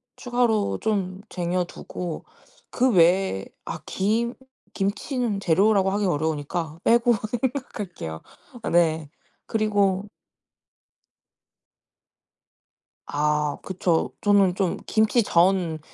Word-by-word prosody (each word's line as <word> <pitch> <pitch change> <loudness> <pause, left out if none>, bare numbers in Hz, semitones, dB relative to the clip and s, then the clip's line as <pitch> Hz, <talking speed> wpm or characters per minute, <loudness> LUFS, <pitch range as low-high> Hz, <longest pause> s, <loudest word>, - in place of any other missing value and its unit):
추가로 240 -4 +1
좀 195 -3 -1
쟁여두고 175 -1 -4 0.4
그 255 0 +2
외에 175 - +3 0.2
아 - - -5
김 225 +5 0 0.4
김치는 210 +2 -1
재료라고 195 +2 +3
하기 205 0 0
어려우니까 160 0 -2
빼고 235 +1 +4 0.3
생각할게요. 210 - -4 0.4
어 - - -2
네 160 -3 +2 0.4
그리고 205 -2 +1 3.0
아 150 0 0
그쵸. 180 -3 0
저는 200 -3 +4
좀 190 -3 0
김치전, 190 -7 +2
190 Hz, 180 characters per minute, -24 LUFS, 170-215 Hz, 3.0 s, 빼고